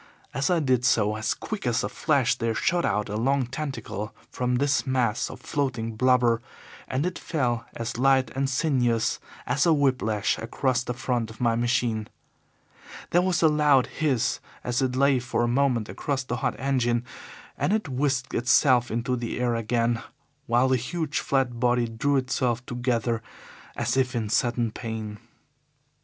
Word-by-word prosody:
As 140 +4 0
I 175 -2 +3
did 130 -5 +2
so, 110 -5 +3
as 110 +1 -1
quick 210 - -5
as 120 -1 +1
a - - 0
flash 135 +1 +1
there 115 -1 -2
shot 170 +8 +1
out 105 +1 0
a 105 - -4
long 135 +4 +1
tentacle 120 -6 -5 0.2
from 125 0 0
this 140 +1 +1
mass 125 -4 +1
of - - -9
floating 120 -6 -2
blubber, 120 -1 +3 0.5
and 130 +4 -1
it 180 - -3
fell 120 -7 -1
as 115 0 -4
light 130 -2 +3
and 135 +1 0
sinuous 125 -5 +1 0.3
as 140 +7 +1
a 165 - +6
whip 140 -3 +2
lash 105 -1 0
across 125 +2 0
the 125 - -4
front 120 -2 -1
of 110 - -12
my 115 -2 +2
machine. 115 -2 0 1.0
There 175 - +4
was 180 -2 +1
a - - +7
loud 150 -4 +4
hiss 130 -7 0 0.2
as 125 +1 0
it 130 -1 0
lay 135 0 +4
for 120 -1 -1
a - - +2
moment 120 -3 +1
across 135 -2 -2
the 120 -1 -3
hot 130 - -1
engine, 125 -3 +1 0.5
and - - 0
it 215 -4 0
whisked 135 -1 -1
itself 120 0 +4
into 120 +3 -1
the 120 0 -4
air 125 -1 +1
again, 115 0 0 0.5
while 120 +2 +3
the 130 - +3
huge, 155 +5 -2
flat 130 -3 0
body 120 -1 +2
drew 120 +6 0
itself 125 -2 -1
together 120 -2 -1 0.5
as - - -1
if 130 -2 +1
in 110 -3 -1
sudden 120 0 +1
pain. 110 -2 -6
125 Hz, 170 wpm, -26 LUFS, 115-135 Hz, 1.0 s, a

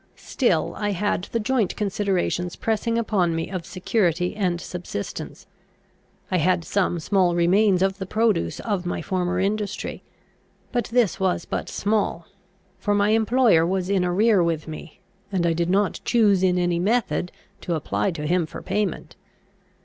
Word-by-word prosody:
Still - - 0
I 205 -1 0
had 195 -1 -1
the 230 - -2
joint 225 -2 0
considerations 195 -4 -1
pressing 225 +1 -1
upon 195 -7 +1
me 165 +2 -3
of 185 -4 -5
security 180 -2 0
and 180 -5 0
subsistence. 175 - -6 0.9
I 185 - +2
had 175 0 +1
some 185 -3 0
small 180 0 +2
remains 185 +2 +3
of 195 +1 0
the 190 - -4
produce 215 - +1
of 205 -5 -2
my - - -3
former 180 -1 -1
industry; 205 +1 -2 0.7
but 240 -1 0
this 230 -6 +1
was 185 -2 0
but - - -4
small, 205 -5 -1 0.5
for 205 -1 0
my 205 0 +3
employer 225 -4 +4
was 185 +2 -1
in 190 -2 +2
arrear 195 +3 +3
with 165 -2 -1
me, 155 0 -9 0.3
and 185 -3 0
I 170 - +2
did 170 +1 -1
not 200 +1 +1
choose 210 -6 +3
in 180 -1 +3
any 175 -1 +1
method 210 -2 0 0.3
to 170 - -2
apply 160 +5 -1
to 160 -4 -4
him 170 +1 +1
for - - -9
payment. 200 -2 -2
190 Hz, 155 wpm, -23 LUFS, 175-210 Hz, 0.9 s, employer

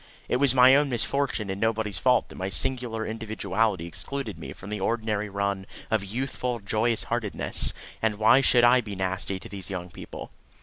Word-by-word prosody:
It - - +1
was 130 -1 +3
my 130 +1 +8
own 145 0 +3
misfortune 120 -3 0
and 95 - -5
nobody's 110 -3 0
fault 125 -3 +3
that - - -11
my 95 +1 -3
singular 120 -1 +1
individuality 110 -4 -1
excluded 140 +10 -5
me - - -7
from 100 - -10
the 105 - -3
ordinary 105 0 -1
run 100 -1 -2 0.2
of 110 -2 +1
youthful 125 +3 -3
joyous 110 +2 +1
heartednesses, 115 -3 0 0.3
and 110 -1 +1
why 110 +5 +5
should 125 -2 +4
I 125 +1 +6
be 105 -3 -7
nasty 95 0 -2
to - - -10
these 95 -2 -7
young 90 -2 -5
people? - - -9
110 Hz, 180 wpm, -26 LUFS, 100-125 Hz, 0.3 s, my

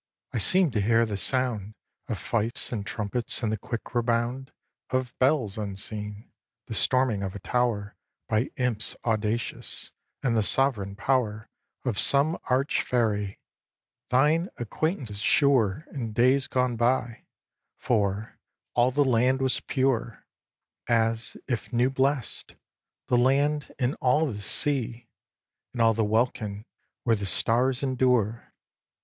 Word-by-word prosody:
I - - 0
seem'd 180 - +3
to 105 - +1
hear 115 +3 +3
the 105 -2 -4
sound 110 -2 0 0.3
Of - - -2
fifes 115 +1 -2
and 110 -4 -3
trumpets 110 +4 -1
and 110 - +1
the 110 - -1
quick 120 +2 -6
rebound 120 +2 -1 0.4
Of 130 -1 -1
bells 130 -7 +2
unseen, 105 +1 -5 0.3
the - - -6
storming 130 -3 +2
of 95 -1 -4
a - - -5
tower 110 -1 -1 0.3
By 110 +4 0
imps 120 -4 -1
audacious, 110 0 -1 0.3
and 120 -4 +1
the 110 - +3
sovereign 105 -4 +1
power 110 -3 -1 0.3
Of 120 -6 0
some 145 +4 +4
arch 130 +3 +1
fairy, 105 -5 -1 0.7
thine 150 +8 +3
acquaintance 120 - -3
sure 130 0 +3
In 115 -6 -5
days 130 +4 +3
gone 125 -2 0
by; 120 0 0 0.5
for, 105 -2 -1 0.3
all 120 +1 +3
the 145 +2 +2
land 130 +1 +2
was 130 -1 +1
pure, 130 -4 -1 0.6
As 115 0 +1
if 120 -4 -3
new 125 +2 +2
blest, 135 -2 -1 0.5
the 125 - +2
land 140 +4 +2
and 125 0 0
all 145 +4 +3
the 110 -9 -4
sea 120 0 0 0.7
And 125 - -7
all 115 0 +5
the 110 +1 0
welkin 110 -1 -1 0.4
where 115 -2 +3
the 100 -2 -3
stars 125 - +2
endure. 125 -4 +1
120 Hz, 130 wpm, -26 LUFS, 110-130 Hz, 0.7 s, all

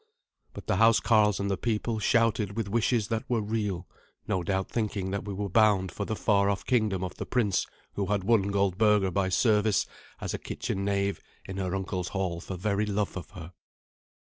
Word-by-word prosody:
But - - -8
the - - 0
housecarls 110 -2 +4
and 100 0 -1
the 95 - 0
people 110 0 -1
shouted 110 -2 +1
with 115 -3 -1
wishes 115 0 +1
that 110 -1 -1
were 120 -2 +2
real, 105 -4 -2 0.4
no 95 - 0
doubt 95 +2 -1
thinking 105 -4 -2
that 100 0 -3
we 100 - -4
were 100 +1 -2
bound 100 -2 +3
for 100 - -4
the 110 - -2
far 100 -2 +2
off 100 -1 -2
kingdom 110 -7 +1
of 90 - -4
the - - -4
prince 110 -7 +1 0.3
who 100 -1 -2
had 100 -1 0
won 100 -1 +3
Goldberga 100 0 +2
by 95 0 0
service 105 +1 +3 0.3
as - - -4
a - - -3
kitchen 100 - -4
knave 100 0 0 0.2
in 95 - -6
her 95 -1 -2
uncle's 95 -2 -3
hall 90 -4 -2
for 95 - -6
very 100 +3 0
love 105 0 -1
of 95 - -7
her. 90 0 -10
100 Hz, 195 wpm, -28 LUFS, 95-110 Hz, 0.4 s, housecarls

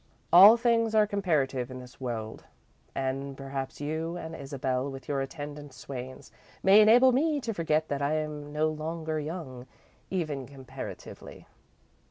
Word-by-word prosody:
"All 200 +6 +10
things 230 -2 +2
are 215 -1 +6
comparative 155 - 0
in 130 - -7
this 125 +1 -13
world, 115 -3 -5 0.5
and 135 +1 -3
perhaps 135 -1 -5
you 160 +4 -3
and 160 -1 -7
Isabel, 135 -1 -2
with 135 -1 -9
your 140 -2 -1
attendant 145 0 -7
swains, 130 0 -8 0.3
may 200 +3 +7
enable 240 +5 +7
me 295 +4 +1
to 230 -4 -3
forget 160 -3 0
that 140 0 -2
I'm 150 0 -2
no 155 +1 +1
longer 155 0 -3
young, 145 -5 -6 0.4
even 155 -8 -3
comparatively." 135 -2 -9
150 Hz, 140 wpm, -28 LUFS, 135-175 Hz, 0.5 s, All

